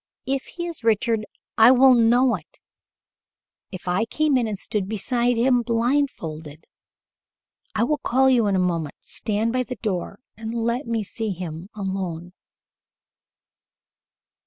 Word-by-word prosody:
If 270 0 -1
he 345 - -6
is 335 -7 -7
Richard, 225 0 +1 0.3
I 225 +2 +9
would 260 +1 +7
know 240 +2 +4
it - - -8 1.1
if 185 -2 -9
I 180 +5 +1
came 305 +4 +1
in 245 -3 +2
and 210 -2 -3
stood 195 0 -3
beside 240 +3 0
him 245 +1 +3
blindfolded. 230 - -2 1.1
I 220 - +2
will 295 +5 0
call 265 +2 +2
you 245 -5 +4
in 200 - +1
a 180 -1 +2
moment. 160 -4 -4
Stand 220 +2 -1
by 255 - +1
the 250 0 -5
door, 200 -3 -4 0.2
and 225 +1 -6
let 235 +3 -1
me 230 -2 -1
see 220 +2 -4
him 175 -1 -6
alone." 185 -4 -4
225 Hz, 140 wpm, -23 LUFS, 190-250 Hz, 1.1 s, I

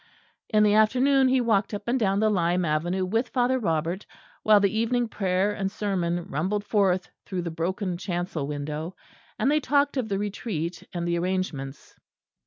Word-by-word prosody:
In 215 0 +4
the 210 -1 +4
afternoon 260 +5 +4
he 260 0 +3
walked 215 -3 +1
up 205 +1 -8
and 250 +2 +1
down 195 -3 +2
the 215 0 +3
lime 175 -2 +1
avenue 175 +5 0
with 225 +7 0
Father 255 0 +1
Robert, 170 -1 -1 0.4
while 215 -1 +6
the 200 +1 +1
evening 235 +2 +1
prayer 195 -1 0
and 195 -2 -2
sermon 175 -5 -1
rumbled 195 +4 -1
forth 195 -4 +1
through 185 -2 -4
the 170 - -4
broken 180 +3 -2
chancel 175 -5 -3
window; 150 +4 -4 0.4
and 265 +6 +2
they 305 - +3
talked 285 0 +1
of 240 -4 -1
the 195 - 0
Retreat 190 -5 -3
and 175 -1 -3
the 170 0 0
arrangements. 170 -7 -4
195 Hz, 175 wpm, -26 LUFS, 175-220 Hz, 0.4 s, while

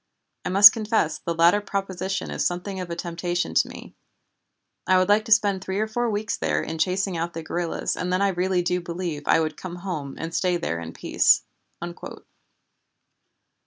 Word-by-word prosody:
I - - -3
must 200 +2 +9
confess 210 -9 0
the 170 +1 -3
latter 170 +5 +4
proposition 195 -1 -3
is - - -2
something 185 +2 -3
of 180 -1 -5
a 170 - -3
temptation 175 +1 -3
to - - +3
me. - - -11 0.9
I 185 - +5
would 185 +1 +2
like 210 +1 +4
to - - -8
spend 205 -3 +3
three 190 +1 -3
or 215 - +1
four 235 +2 -2
weeks 215 +1 -2
there - - 0
in 160 - -5
chasing 185 +2 0
out 170 +1 -3
the 165 - -5
guerrillas, 170 +1 -2
and 180 0 -3
then 185 - +1
I 200 0 +2
really 180 0 0
do 180 +1 0
believe 170 -3 -4
I - - +5
could 155 -2 -2
come 180 -2 -7
home 170 -7 -5
and 165 0 -6
stay 180 +1 +1
there 85 - -3
in 85 0 -8
peace." - - +3
180 Hz, 190 wpm, -24 LUFS, 170-195 Hz, 0.9 s, must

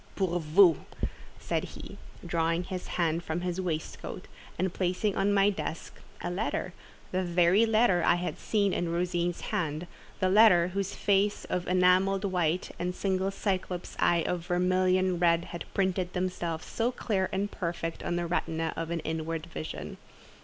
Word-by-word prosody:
pour 180 -3 0
vous," 165 +1 +5 0.6
said - - -1
he, - - -9 0.3
drawing 165 +1 0
his 180 0 -5
hand 170 -1 +1
from 170 +1 -3
his 180 +1 -2
waist 160 -4 -3
coat, - - -7 0.3
and 185 0 -1
placing 185 +2 0
on 195 +1 +2
my 200 0 +4
desk 170 -4 -6 0.2
a - - -3
letter—the 185 -1 -4
very 180 +4 +4
letter 215 -5 +4
I - - +5
had 175 +1 -3
seen 200 -3 +1
in 175 -1 -1
Rosine's 175 0 -1
hand—the 170 +3 -3
letter 185 -3 +6
whose 195 +1 -3
face 200 +1 +1
of 180 -1 -2
enamelled 185 +2 +3
white 180 -2 0
and 180 +1 -2
single 190 -1 0
Cyclop's 190 -2 -3
eye 170 -1 +3
of 175 -1 -2
vermilion 185 0 +2
red 170 -1 +3
had 170 - -5
printed 185 -2 0
themselves 175 -3 -2
so 235 +2 -1
clear 200 -6 -1
and 200 +2 -1
perfect 170 -2 -4
on 175 - -2
the 175 0 -1
retina 165 -1 -1
of 165 0 -4
an 170 -1 -2
inward 160 0 -3
vision. 165 -2 -6
180 Hz, 155 wpm, -29 LUFS, 170-190 Hz, 0.6 s, letter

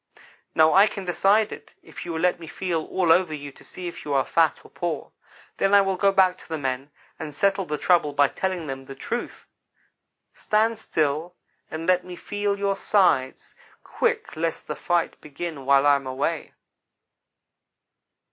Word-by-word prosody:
Now 160 0 +5
I 195 +3 +7
can 200 -2 -6
decide 200 +4 +3
it, - - -11
if - - -10
you - - -3
will 160 - -2
let 180 -1 +2
me 165 - -9
feel 165 -1 -2
all 180 -3 +1
over 170 -2 +3
you 145 -1 -8
to - - -17
see 180 -1 -7
if 170 - -7
you 145 -1 -2
are 135 -2 +2
fat 165 -2 +1
or - - -16
poor. 170 -2 -4 0.5
Then 195 +1 +3
I 200 - +8
will 195 -1 0
go 195 +2 +3
back 185 -1 +3
to - - -16
the 160 - -2
men 135 0 -3 0.3
and 150 -2 -6
settle 195 +1 +1
the 150 -2 -3
trouble 170 -2 +3
by 145 -1 +3
telling 185 -3 -3
them 135 -2 -6
the 135 - -9
truth. 235 - -5 0.9
Stand 220 +1 +1
still 155 0 -1 0.3
and 160 +1 -5
let 180 0 +3
me 180 -1 -8
feel 205 +2 -2
your 200 0 0
sides 180 -11 +1 0.3
quick, - - -1
lest 165 +1 -2
the - - -4
fight 175 -2 -1
begin 155 -1 -6
while 140 0 +5
I 145 -1 +6
am 135 -1 -8
away.' 140 +5 -3
170 Hz, 185 wpm, -24 LUFS, 145-190 Hz, 0.9 s, I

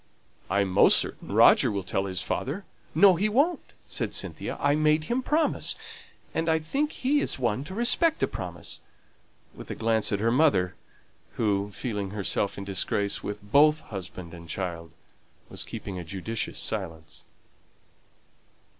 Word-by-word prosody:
"I'm 100 -2 +1
almost - - +8
certain - - -2
Roger - - +6
will 100 -2 -2
tell 95 +2 -1
his 95 -2 -3
father." 170 +10 -3 0.3
"No, 200 -2 +7
he 210 +5 +1
won't," 290 +10 +1
said - - -3
Cynthia; - - -3
"I 145 0 +3
made 155 +1 +3
him 240 +10 -1
promise, 305 +4 +1 0.6
and 165 0 0
I 160 - +4
think 275 - -1
he 280 +3 +1
is - - -1
one 120 -1 0
to 190 - -7
respect 280 +8 +3
a - - +4
promise" 90 -5 -5 0.7
with - - -11
a - - -4
glance 110 -1 +1
at 100 - 0
her 115 +2 +2
mother, 125 - +3 0.6
who, 100 -2 0
feeling 105 -3 -3
herself 100 0 -1
in 100 - -5
disgrace 100 +1 -1
with 105 0 -5
both 150 +8 +4
husband 95 -3 -8
and 85 -1 -11
child, 85 -2 -4 0.6
was - - -3
keeping 95 -3 -6
a - - -5
judicious 100 +6 -4
silence. 80 -7 -4
105 Hz, 155 wpm, -27 LUFS, 95-160 Hz, 0.7 s, almost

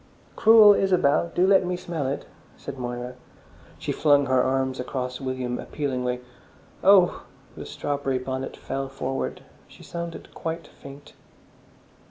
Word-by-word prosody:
"Cruel 220 -2 +8
Isabel! 170 -5 +2
Do 180 - +4
let 195 0 +5
me 180 0 -2
smell 165 -6 -4
it!" 140 - -3 0.3
said 135 - -8
Moira. 120 0 -5 0.6
She - - -3
flung 145 -2 +3
her 130 -1 +3
arms 130 0 0
across 125 0 -4
William 130 -2 -3
appealingly. 125 -4 -3 0.6
"Oh!" 190 -2 +5 0.3
The - - -8
strawberry 140 -2 -2
bonnet 130 +1 -5
fell 135 0 -4
forward: 135 0 -4 0.2
she - - -16
sounded 170 -1 -7
quite 165 -1 -5
faint. 140 +1 -13
135 Hz, 130 wpm, -25 LUFS, 130-170 Hz, 0.6 s, Cruel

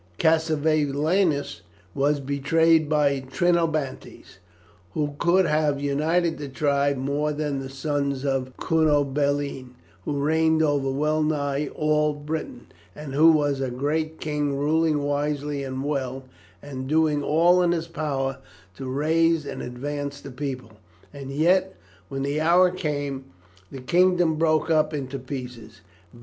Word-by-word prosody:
Cassivelaunus 155 0 +1 0.3
was 145 +1 +1
betrayed 150 +3 +2
by 145 -3 +2
the 130 - -12
Trinobantes. 155 - -1 0.6
Who 145 -1 -1
could 180 +2 +3
have 150 -2 +1
united 160 +4 0
the 145 -2 -6
tribes 140 0 +1
more 140 +3 -1
than 145 -2 -2
the 135 0 -6
sons 140 0 -2
of 130 -2 -2
Cunobeline, 145 -4 0 0.3
who 150 - -2
reigned 160 +2 +2
over 145 -3 +1
well 150 +3 0
nigh 145 -2 -1
all 150 0 +1
Britain, 145 -3 -6 0.3
and 150 -3 -8
who 160 +4 +6
was 145 -3 +1
a 130 - -1
great 155 +5 -2
king 150 -2 -2
ruling 155 +1 +1
wisely 145 0 -2
and 130 0 -4
well, 135 -2 -3 0.4
and 130 -2 -6
doing 155 0 +2
all 170 +5 +4
in 175 -1 +2
his 165 -1 -2
power 135 -5 -3 0.4
to 130 - -6
raise 160 +3 +1
and 140 - -6
advance 140 +3 -5
the 140 - -10
people; 130 -3 -5 0.4
and 140 -2 -8
yet, 180 +7 +2 0.3
when 135 -1 -3
the 145 +2 -1
hour 175 +3 +5
came, 145 -6 -3 0.5
the 135 - -7
kingdom 175 +3 +3
broke 155 0 +1
up 155 -1 +2
into 135 -1 -4
pieces. 125 -4 -8
145 Hz, 135 wpm, -24 LUFS, 140-160 Hz, 0.6 s, who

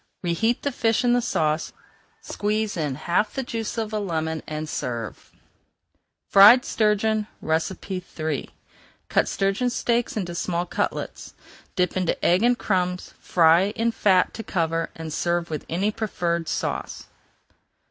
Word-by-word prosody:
Reheat 225 +8 0
the 285 - 0
fish 230 -1 +1
in 240 -1 +3
the 245 - +3
sauce, 155 -8 0 0.5
squeeze 215 +1 -2
in 150 -5 -1
the 210 - -1
juice 230 -1 -4
of 220 -1 -2
half - - -11
a - - 0
lemon, 160 -3 -2
and 155 0 -4
serve. 120 -7 -5 1.0
FRIED 215 +6 +8
STURGEON 215 0 +1 0.2
III 160 -2 -3 0.6
Cut - - +2
sturgeon 195 +6 0
steaks 235 -1 0
into 175 -4 -3
small 170 0 -1
cutlets. - - -4 0.4
Dip 180 -2 +1
into 185 -2 -1
egg 180 +3 +4
and 240 +1 +3
crumbs, 180 -4 -1
fry 170 +1 +4
in 230 +1 +1
fat 190 -5 +3
to - - -6
cover, 165 -5 -1
and 160 -1 -6
serve 170 +1 -1
with 155 - -5
any 195 +6 0
preferred 170 -6 -2
sauce. - - -3
185 Hz, 135 wpm, -24 LUFS, 165-220 Hz, 1.0 s, FRIED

